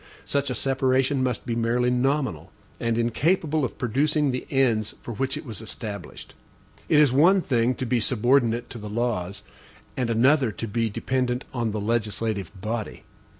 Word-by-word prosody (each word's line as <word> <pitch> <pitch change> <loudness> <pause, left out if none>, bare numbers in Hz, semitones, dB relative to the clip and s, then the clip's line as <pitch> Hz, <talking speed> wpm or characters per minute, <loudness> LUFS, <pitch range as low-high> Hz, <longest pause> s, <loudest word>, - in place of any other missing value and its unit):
Such 140 -1 0
a 125 - -2
separation 135 +2 +1
must 125 -3 -1
be 115 - -2
merely 120 +2 +1
nominal, 125 - 0 0.3
and 115 -1 0
incapable 155 - +1
of 125 - -3
producing 145 +4 +1
the 125 - -4
ends 120 -6 +1
for 120 - -5
which 135 +5 -2
it - - -8
was 115 -3 -7
established. 110 -2 -7 0.6
It 155 - +5
is 150 -4 +5
one 175 +8 +5
thing 125 -6 +1
to 130 - -3
be 125 0 +1
subordinate 120 0 +2
to 120 - -7
the 105 0 -7
laws, 105 -4 -2 0.5
and 125 -3 -1
another 130 +2 +3
to 115 - -5
be 115 +1 0
dependent 125 +3 -1
on 120 -3 -1
the 105 0 -3
legislative 105 -3 -1
body. 110 +2 -4
120 Hz, 165 wpm, -25 LUFS, 110-135 Hz, 0.6 s, It